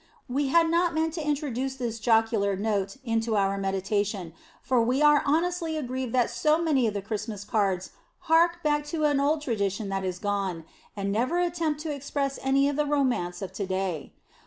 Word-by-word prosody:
We 275 +3 0
had 330 +4 +4
not 335 0 +2
meant 320 0 0
to 325 -2 -4
introduce 270 -3 -2
this 235 -3 -4
jocular 220 -3 +2
note 200 0 -1
into 225 -1 0
our 195 -1 +2
meditation, 195 -2 -1 0.3
for 250 -1 +2
we 250 +4 +1
are 295 -1 +6
honestly 330 +1 0
aggrieved 260 -3 -3
that 245 -2 +2
so 300 +7 +2
many 290 -8 +2
of 210 - -2
the 200 - -3
Christmas 215 -1 -4
cards 195 -3 0 0.3
hark 340 +2 +3
back 295 -1 +2
to 310 +1 -3
an 290 -2 +3
old 295 +2 +1
tradition 200 -4 -1
that 195 0 -2
is 185 -1 -2
gone, 195 -4 -2 0.3
and 200 0 -1
never 250 +11 0
attempt 335 -4 0
to 310 -1 -3
express 280 0 -3
any 275 +1 +3
of 285 0 -1
the 300 - +2
romance 250 -12 0
of 190 -1 -6
to 200 0 -3
day. 185 -6 -2
245 Hz, 185 wpm, -27 LUFS, 200-295 Hz, 0.3 s, are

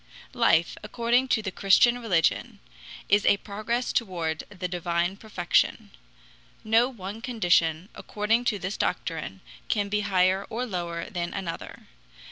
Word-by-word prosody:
Life, 230 -9 +3
according 235 +4 +1
to 220 -4 +1
the 190 - -3
Christian 240 +6 +4
religion, 180 -9 0 0.5
is 205 +1 +4
a 200 - +4
progress 215 +5 -3
toward 170 -8 -2
the 185 -3 -5
divine 175 +1 -1
perfection. 200 -5 0 0.7
No 225 +3 +3
one 210 -2 -8
condition, 175 -8 +1
according 220 +3 -1
to 215 - +1
this 190 +2 -4
doctrine, - - -3 0.3
can 205 -2 0
be 210 +1 +1
higher 190 -1 +1
or 245 +3 -3
lower 170 -5 -4
than 175 -1 -4
another. 185 -4 -6
200 Hz, 130 wpm, -26 LUFS, 175-225 Hz, 0.7 s, Christian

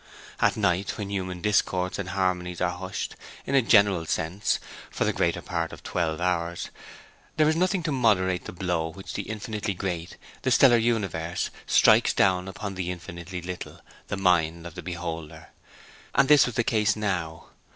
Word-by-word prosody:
At - - +2
night, 90 +3 0
when 100 -2 -5
human 95 -2 -3
discords 95 -3 +1
and 95 -2 -3
harmonies 90 -2 -1
are 90 -1 +1
hushed, 95 +1 -5 0.3
in - - -3
a 135 - +6
general 100 -7 +4
sense, 90 +7 0 0.3
for - - -1
the - - +1
greater - - 0
part 85 -2 -2
of - - -11
twelve 80 -2 -1
hours, 85 -1 -1 0.7
there 155 -1 +5
is 155 - +3
nothing 185 +1 +1
to 155 - -1
moderate 95 -8 +2
the - - -6
blow 90 -3 -1
with 80 - -10
which 95 - -8
the - - -5
infinitely 105 -2 -3
great, 90 -2 -4 0.2
the 130 - 0
stellar 125 -1 +6
universe, 100 -8 -1 0.2
strikes - - +5
down 95 -1 +3
upon 95 +1 -5
the 90 -2 -3
infinitely 90 0 -7
little, 90 0 -7 0.3
the 100 - -3
mind 85 -3 +2
of 85 - -7
the - - -7
beholder; 85 -3 -6 0.7
and 140 -1 +5
this 150 -4 +7
was 125 - -5
the 120 - +2
case 105 -3 +2
now. 90 -6 -3
95 Hz, 175 wpm, -26 LUFS, 85-105 Hz, 0.7 s, this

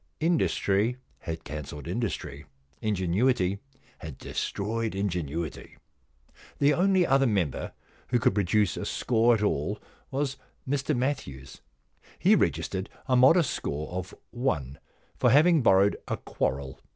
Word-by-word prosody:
Industry 125 - +1 0.2
had 80 0 -6
cancelled 75 0 -7
industry; 90 - -4 0.3
ingenuity 100 0 +1 0.4
had 80 -5 -8
destroyed 110 +1 -3
ingenuity. 85 -5 -3 0.8
The 145 +1 +4
only 185 +2 +3
other 135 -1 +3
member 95 - -1 0.3
who 125 - +2
could 110 - +2
produce 100 0 +1
a - - -4
score 120 0 +2
at 105 - -2
all 100 +1 0 0.3
was 135 0 -2 0.3
Mr 140 +1 0
Matthews. 70 - -4 0.6
He - - +4
regis - - +1
tered 95 +2 -3 0.2
a 130 - +2
modest 135 +5 +5
score 75 +3 -4
of 90 0 -5 0.2
one 80 - -2 0.4
for - - +4
having 155 +3 +5
borrowed 100 -2 +4
a - - -2
quarrel. 65 0 -3
105 Hz, 125 wpm, -27 LUFS, 85-130 Hz, 0.8 s, modest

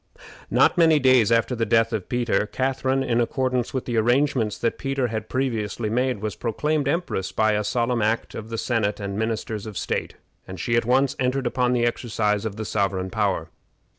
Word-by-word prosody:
Not - - +3
many 160 -2 +6
days 130 -5 +4
after 115 +2 +2
the 115 - -1
death 115 +1 +2
of 105 -4 -3
Peter, 120 -4 0
Catharine, 130 +2 0
in 120 -1 +1
accordance 125 0 -1
with 130 -2 -3
the 120 -3 -2
arrangements 120 -2 +2
that 115 - -1
Peter 135 -2 -1
had 110 -1 -4
previously 115 -4 -2
made, 125 -2 0
was 105 -4 -3
proclaimed 145 +5 -1
empress 140 - -1
by 110 +2 +2
a 105 0 0
solemn 120 +2 0
act 110 +2 0
of 110 0 -7
the 115 - -4
senate 110 -4 0
and 100 -1 -4
ministers 110 -1 -3
of 105 - -7
state, - - -3 0.3
and 95 -1 -8
she 115 - 0
at 115 - +2
once 130 +2 +2
entered 130 +1 0
upon 125 0 +1
the 120 -1 +2
exercise 110 -3 -1
of 105 -2 -3
the 110 0 -5
sovereign 95 -3 -1
power. 100 -7 -1
115 Hz, 195 wpm, -24 LUFS, 105-130 Hz, 0.3 s, many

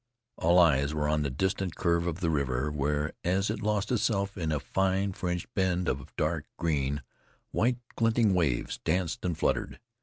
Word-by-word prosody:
All 85 +2 +3
eyes 75 -4 +4
were 75 -1 0
on 75 0 +1
the 70 - 0
distant 95 +5 -1
curve 85 0 +1
of 85 +2 -3
the 85 -2 +1
river 70 -1 0
where, 75 +1 -1
as 95 +4 +1
it 110 - -4
lost 105 0 0
itself 100 -4 +1
in 80 -4 -2
a 75 - +1
fine 95 +4 0
fringed 90 -1 -3
bend 90 -2 +1
of 70 +3 -3
dark 75 0 -1
green, 75 -3 0 0.5
white 120 +2 +2 0.2
glinting 115 -2 +3
waves 80 -10 0
danced 90 -3 0
and 85 -4 -1
fluttered. - - -1
85 Hz, 175 wpm, -29 LUFS, 75-95 Hz, 0.5 s, eyes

